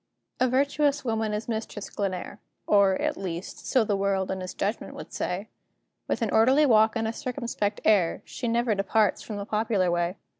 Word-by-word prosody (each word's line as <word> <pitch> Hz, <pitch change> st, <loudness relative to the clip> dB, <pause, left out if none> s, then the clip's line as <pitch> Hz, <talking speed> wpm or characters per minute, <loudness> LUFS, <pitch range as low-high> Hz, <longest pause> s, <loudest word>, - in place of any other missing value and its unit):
A 255 Hz, -, +4 dB
virtuous 285 Hz, +2 st, +1 dB
woman 220 Hz, -2 st, 0 dB
is 210 Hz, +1 st, -3 dB
Mistress 220 Hz, -3 st, -4 dB
Glenare 195 Hz, +1 st, -4 dB, 0.3 s
Or, 200 Hz, -2 st, +4 dB
at -, -, -1 dB
least, 180 Hz, -1 st, -6 dB
so 255 Hz, -, +3 dB
the 205 Hz, -2 st, 0 dB
world 195 Hz, -1 st, 0 dB
in 190 Hz, 0 st, -3 dB
its 185 Hz, -, -6 dB
judgment 205 Hz, +3 st, -3 dB
would -, -, -9 dB
say; 195 Hz, +4 st, -3 dB, 0.6 s
With -, -, -1 dB
an 220 Hz, -, -1 dB
orderly 260 Hz, +7 st, +5 dB
walk 220 Hz, -3 st, +4 dB
and 225 Hz, -1 st, 0 dB
a 225 Hz, -, -2 dB
circumspect 235 Hz, -6 st, -3 dB
air, 195 Hz, -6 st, +3 dB
She 245 Hz, -, -5 dB
never 235 Hz, 0 st, +2 dB
departs 205 Hz, +1 st, +1 dB
from 215 Hz, -, -6 dB
the 200 Hz, -, -4 dB
popular 210 Hz, -4 st, +1 dB
way. 175 Hz, +1 st, 0 dB
215 Hz, 185 wpm, -26 LUFS, 195-235 Hz, 0.6 s, orderly